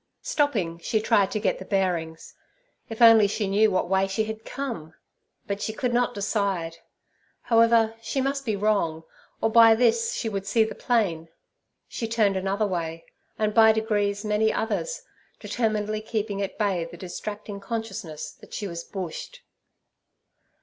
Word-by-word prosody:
Stopping, 240 Hz, -, 0 dB
she 220 Hz, +6 st, 0 dB
tried 200 Hz, -2 st, +3 dB
to 215 Hz, -, -2 dB
get 205 Hz, -, 0 dB
the -, -, -7 dB
bearings. 175 Hz, -5 st, -2 dB, 0.6 s
If 225 Hz, +1 st, 0 dB
only 225 Hz, -2 st, +8 dB
she 205 Hz, 0 st, -2 dB
knew 210 Hz, +3 st, +4 dB
what 185 Hz, -2 st, 0 dB
way 190 Hz, +1 st, +2 dB
she 195 Hz, +3 st, -1 dB
had 220 Hz, 0 st, -6 dB
come! 230 Hz, -, -6 dB, 0.5 s
But 200 Hz, 0 st, -4 dB
she 220 Hz, -, -2 dB
could 245 Hz, +2 st, -2 dB
not 245 Hz, 0 st, +1 dB
decide. 195 Hz, -5 st, -1 dB, 0.6 s
However, 230 Hz, -1 st, +4 dB
she 250 Hz, +4 st, -2 dB
must 275 Hz, +1 st, -1 dB
be 220 Hz, -5 st, -1 dB
wrong, 195 Hz, -6 st, 0 dB, 0.4 s
or 225 Hz, -, +1 dB
by 225 Hz, -1 st, +7 dB
this 230 Hz, -1 st, +2 dB
she -, -, -3 dB
would 195 Hz, -2 st, -4 dB
see 225 Hz, +2 st, +3 dB
the 220 Hz, -, -4 dB
plain. 180 Hz, -9 st, 0 dB, 0.6 s
She 230 Hz, -, -4 dB
turned 220 Hz, -3 st, +2 dB
another 195 Hz, +3 st, 0 dB
way, 165 Hz, -4 st, -3 dB, 0.3 s
and 215 Hz, -1 st, 0 dB
by 220 Hz, 0 st, +7 dB
degrees 205 Hz, -2 st, -1 dB
many 215 Hz, +1 st, +2 dB
others, 225 Hz, -, -2 dB, 0.4 s
determinedly 215 Hz, -2 st, -1 dB
keeping 215 Hz, -2 st, -3 dB
at 195 Hz, -, -4 dB
bay 195 Hz, -5 st, 0 dB
the 170 Hz, +1 st, -9 dB
distracting 205 Hz, +3 st, -6 dB
consciousness 195 Hz, -7 st, -5 dB
that -, -, -13 dB
she 210 Hz, -, -4 dB
was 170 Hz, -3 st, -5 dB
bushed. 195 Hz, -, -7 dB
210 Hz, 155 wpm, -25 LUFS, 190-225 Hz, 0.6 s, only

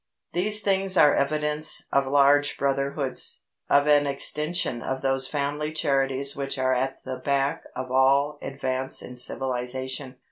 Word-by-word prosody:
These 210 Hz, +5 st, 0 dB
things 195 Hz, -2 st, +2 dB
are 145 Hz, -, +6 dB
evidence 150 Hz, +2 st, 0 dB
of 140 Hz, -1 st, +2 dB
large 145 Hz, +1 st, +3 dB
brotherhoods, 140 Hz, 0 st, -2 dB, 0.3 s
of 145 Hz, 0 st, +4 dB
an 145 Hz, -1 st, +4 dB
extension 150 Hz, -2 st, -1 dB
of 130 Hz, 0 st, -3 dB
those 135 Hz, -1 st, 0 dB
family 150 Hz, +1 st, -2 dB
charities 135 Hz, -2 st, 0 dB
which 140 Hz, 0 st, -3 dB
are 130 Hz, 0 st, +1 dB
at 130 Hz, +1 st, -2 dB
the 130 Hz, -1 st, -5 dB
back 140 Hz, 0 st, -1 dB
of 130 Hz, 0 st, -5 dB
all 140 Hz, +3 st, +3 dB
advance 130 Hz, -1 st, -1 dB
in 125 Hz, -, -9 dB
civilisation. 130 Hz, +1 st, -3 dB
140 Hz, 140 wpm, -25 LUFS, 130-145 Hz, 0.3 s, are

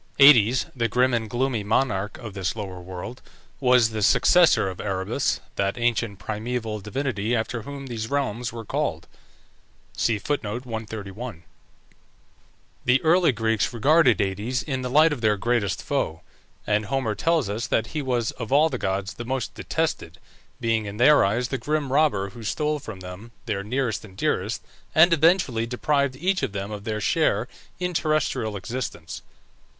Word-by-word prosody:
Aïdes, 130 Hz, -3 st, +7 dB
the 115 Hz, -2 st, +1 dB
grim 125 Hz, +2 st, +2 dB
and 110 Hz, -2 st, -1 dB
gloomy 120 Hz, -2 st, -1 dB
monarch 105 Hz, -2 st, 0 dB
of 110 Hz, -5 st, -8 dB
this 95 Hz, -1 st, -2 dB
lower 95 Hz, -4 st, -6 dB
world, 95 Hz, +7 st, -8 dB, 0.4 s
was 125 Hz, -4 st, +4 dB
the 110 Hz, -1 st, -3 dB
successor 130 Hz, -, +5 dB
of 95 Hz, -2 st, -5 dB
Erebus, 100 Hz, +6 st, -1 dB, 0.2 s
that 100 Hz, +3 st, 0 dB
ancient 115 Hz, -3 st, 0 dB
primeval 110 Hz, +1 st, -3 dB
divinity 110 Hz, +1 st, -2 dB
after 115 Hz, +1 st, -2 dB
whom 140 Hz, +3 st, -8 dB
these 115 Hz, -3 st, -5 dB
realms 130 Hz, -4 st, -1 dB
were 115 Hz, -1 st, -7 dB
called. -, -, -2 dB, 1.0 s
The 120 Hz, 0 st, -1 dB, 2.4 s
early 170 Hz, 0 st, +4 dB
Greeks 110 Hz, -2 st, 0 dB
regarded 130 Hz, -, +4 dB
Aïdes 105 Hz, +7 st, -1 dB
in 130 Hz, -4 st, -3 dB
the 125 Hz, -, -3 dB
light 155 Hz, +4 st, +5 dB
of 130 Hz, -, -6 dB
their 105 Hz, -2 st, +2 dB
greatest 105 Hz, -4 st, 0 dB
foe, -, -, -2 dB, 0.4 s
and 105 Hz, 0 st, +1 dB
Homer 130 Hz, -3 st, 0 dB
tells 165 Hz, 0 st, +1 dB
us 110 Hz, +4 st, -3 dB
that 115 Hz, -, +1 dB
he 155 Hz, -, -1 dB
was 125 Hz, -4 st, 0 dB
"of 115 Hz, -2 st, -7 dB
all 150 Hz, +3 st, +5 dB
the 130 Hz, -5 st, -4 dB
gods 95 Hz, +1 st, -2 dB
the 120 Hz, -, -7 dB
most 130 Hz, -1 st, -3 dB
detested," -, -, -3 dB, 0.4 s
being 115 Hz, -3 st, 0 dB
in 100 Hz, +1 st, -6 dB
their 145 Hz, +5 st, +6 dB
eyes 120 Hz, +5 st, 0 dB
the 135 Hz, -, -2 dB
grim 145 Hz, +2 st, -1 dB
robber 105 Hz, -11 st, +2 dB
who 115 Hz, -, -11 dB
stole 150 Hz, +6 st, -1 dB
from 110 Hz, -8 st, -9 dB
them 95 Hz, +6 st, -10 dB
their 100 Hz, -4 st, -2 dB
nearest 120 Hz, +1 st, -1 dB
and 95 Hz, -3 st, -14 dB
dearest, -, -, -1 dB, 0.3 s
and 170 Hz, +2 st, +7 dB
eventually 160 Hz, -8 st, +3 dB
deprived 140 Hz, +2 st, 0 dB
each 185 Hz, +7 st, 0 dB
of -, -, -2 dB
them 100 Hz, +1 st, -4 dB
of 105 Hz, -1 st, -7 dB
their 110 Hz, -1 st, -2 dB
share -, -, +1 dB, 0.3 s
in 180 Hz, 0 st, -2 dB
terrestrial 155 Hz, -10 st, 0 dB
existence. 120 Hz, +6 st, -5 dB
120 Hz, 155 wpm, -24 LUFS, 105-135 Hz, 2.4 s, Aïdes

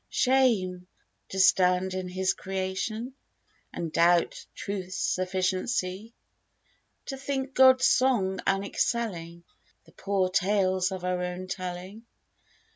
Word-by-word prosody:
Shame! 215 Hz, -9 st, +1 dB, 0.4 s
to 190 Hz, -, -4 dB
stand 185 Hz, 0 st, +4 dB
in 185 Hz, -1 st, -3 dB
His 185 Hz, +1 st, 0 dB
creation 195 Hz, +6 st, -4 dB, 0.6 s
And 165 Hz, -2 st, -5 dB
doubt 170 Hz, +1 st, +2 dB
Truth's 185 Hz, -2 st, -5 dB
sufficiency! 185 Hz, +3 st, -1 dB, 0.9 s
To 270 Hz, -, -5 dB
think 270 Hz, 0 st, -3 dB
God's 260 Hz, -1 st, +6 dB
song 210 Hz, -8 st, +2 dB
unexcelling 195 Hz, -3 st, -1 dB, 0.4 s
The -, -, -19 dB
poor 195 Hz, -2 st, -1 dB
tales 190 Hz, -1 st, +1 dB
of 185 Hz, -1 st, -5 dB
our 180 Hz, 0 st, -1 dB
own 180 Hz, +1 st, -4 dB
telling. 185 Hz, +4 st, -6 dB
190 Hz, 105 wpm, -27 LUFS, 180-220 Hz, 0.9 s, God's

